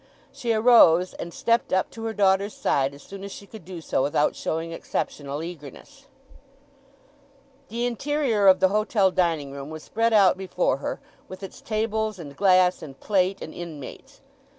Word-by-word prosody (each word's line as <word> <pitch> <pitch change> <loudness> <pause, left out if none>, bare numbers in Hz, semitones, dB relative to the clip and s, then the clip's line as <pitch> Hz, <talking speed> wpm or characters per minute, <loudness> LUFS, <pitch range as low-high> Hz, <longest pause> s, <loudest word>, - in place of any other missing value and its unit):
She 235 - -3
arose, 215 -6 +5
and 170 - -7
stepped 235 +6 0
up 185 0 +1
to 225 0 -8
her 225 - -2
daughter's 200 0 +2
side 140 0 0
as 140 - -15
soon 195 0 -10
as 200 - -7
she 200 - -10
could 215 -2 -12
do 175 0 -8
so 140 - -1
without 145 +2 +1
showing 165 +1 -3
exceptional 145 -2 -4
eagerness. 170 - -11 1.6
The 235 +2 -3
interior 245 -3 0
of 190 -1 +7
the 190 - +5
hotel 210 -1 +2
dining 165 -6 0
room 140 +1 -8
was 155 0 -8
spread 230 +1 0
out 195 -3 +5
before 180 -7 0
her, 140 - -4 0.3
with 185 +1 -10
its 195 - -9
tables, 220 -1 -2
and 145 -5 -10
glass, 185 0 +3
and 135 -4 -10
plate, 195 -1 0
and 155 - -8
inmates. 160 -6 -9
190 Hz, 170 wpm, -25 LUFS, 160-215 Hz, 1.6 s, of